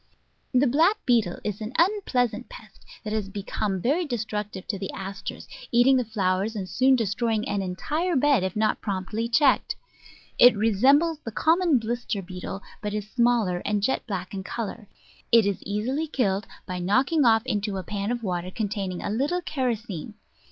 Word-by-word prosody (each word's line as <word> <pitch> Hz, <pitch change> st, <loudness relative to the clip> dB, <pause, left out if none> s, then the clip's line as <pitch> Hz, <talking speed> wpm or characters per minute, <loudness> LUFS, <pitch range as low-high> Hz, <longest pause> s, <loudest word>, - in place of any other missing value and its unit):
The 255 Hz, +2 st, +4 dB
Black 320 Hz, -, +4 dB
Beetle 230 Hz, -8 st, +2 dB
is 210 Hz, 0 st, -4 dB
an 215 Hz, +3 st, -5 dB
unpleasant 335 Hz, -, +1 dB
pest -, -, -14 dB, 0.2 s
that 215 Hz, -1 st, -4 dB
has 210 Hz, -3 st, -2 dB
become 200 Hz, 0 st, -3 dB
very 290 Hz, -, +1 dB
destructive 210 Hz, -, -4 dB
to 200 Hz, -5 st, -2 dB
the 195 Hz, -, -4 dB
Asters, 195 Hz, +1 st, -6 dB, 0.2 s
eating 245 Hz, +3 st, +5 dB
the 250 Hz, -, +1 dB
flow 195 Hz, -5 st, 0 dB
ers, 220 Hz, +4 st, -3 dB
and 195 Hz, -3 st, -4 dB
soon 260 Hz, +6 st, +4 dB
destroying 225 Hz, -1 st, 0 dB
an 200 Hz, -, -1 dB
entire 305 Hz, -, -2 dB
bed 275 Hz, -6 st, +3 dB
if 190 Hz, -1 st, -2 dB
not 215 Hz, 0 st, +1 dB
promptly 205 Hz, +3 st, -2 dB
checked. 265 Hz, +3 st, +3 dB, 0.6 s
It 245 Hz, -3 st, +8 dB
resembles 275 Hz, -, +3 dB
the 230 Hz, -, -7 dB
common 325 Hz, +4 st, +3 dB
blister 230 Hz, -3 st, -3 dB
beetle, 185 Hz, +2 st, -7 dB, 0.2 s
but 210 Hz, 0 st, -3 dB
is 210 Hz, 0 st, -5 dB
smaller 235 Hz, -7 st, +2 dB
and 205 Hz, -1 st, 0 dB
jet 265 Hz, +3 st, 0 dB
black 185 Hz, -3 st, -4 dB
in 190 Hz, -1 st, -4 dB
colour; 215 Hz, 0 st, -5 dB, 0.4 s
it 230 Hz, -2 st, +6 dB
is 200 Hz, -1 st, -1 dB
easily 250 Hz, +10 st, -1 dB
killed 210 Hz, -7 st, 0 dB, 0.2 s
by 180 Hz, 0 st, -4 dB
knocking 260 Hz, -, +2 dB
off 225 Hz, -1 st, +4 dB
into 205 Hz, -5 st, -1 dB
a 190 Hz, -, -4 dB
pan 200 Hz, +3 st, -3 dB
of 240 Hz, -1 st, -2 dB
water 180 Hz, -2 st, -2 dB
containing 195 Hz, -3 st, -3 dB
a -, -, -2 dB
little 290 Hz, +11 st, 0 dB
kerosene. 225 Hz, -, -3 dB
220 Hz, 175 wpm, -25 LUFS, 195-255 Hz, 0.6 s, It